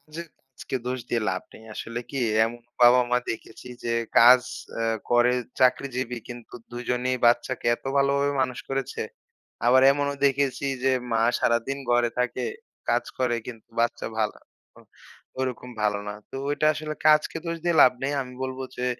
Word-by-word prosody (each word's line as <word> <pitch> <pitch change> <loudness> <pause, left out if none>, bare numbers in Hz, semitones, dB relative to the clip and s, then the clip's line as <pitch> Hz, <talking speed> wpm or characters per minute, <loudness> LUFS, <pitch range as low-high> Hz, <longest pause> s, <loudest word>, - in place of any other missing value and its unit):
যদি 170 0 -6 0.3
আজকে 130 - -4
দোষ 130 +1 -2
দিয়ে 120 - 0
লাভ 95 - -3
নেই। - - -13
আসলে 115 +1 -5
কি? 140 - -4 0.3
এমন 120 +1 -5 0.2
বাবা-মা 125 0 +6
দেখেছি 115 +2 -8 0.2
যে 115 - 0 0.3
কাজ 125 +2 +8 0.4
আ - - 0 0.3
করে, 120 +1 +4 0.3
চাকরিজীবী। 125 -1 +1
কিন্তু 120 -1 -10 0.2
২ 120 0 -5
জনেই 125 +1 0
বাচ্চাকে 120 +1 +1
এত - - -30
ভালোভাবে 140 +1 +2
মানুষ 125 -1 -3
করেছে। 135 -1 -3 0.7
আবার 130 +2 +6
এমনও 140 0 -1
দেখেছি 140 0 0 0.2
যে, 135 - +4 0.2
মা 115 - +2 0.2
সারাদিন 115 +4 0
ঘরে 120 -1 +3
থাকে, 125 0 -1 0.4
কাজ - - +2
করে 125 -2 +1
কিন্তু, 115 -3 -10
বাচ্চা 120 +1 0
ভালো 105 -1 0 0.4
অ - - -15 0.6
ওরকম 125 -1 -3
ভালো 105 -1 +1
না। - - -3 0.2
তো - - -7
ওইটা 150 +1 +1
আসলে 155 0 -5
কাজকে 155 +1 +4
দোষ 165 0 -2
দিয়ে 170 -2 +2
লাভ 125 - +7
নেই। 140 +2 0
আমি 125 0 -11
বলব 130 0 -4 0.2
যে, 125 0 -2
125 Hz, 165 wpm, -25 LUFS, 120-135 Hz, 0.7 s, কাজ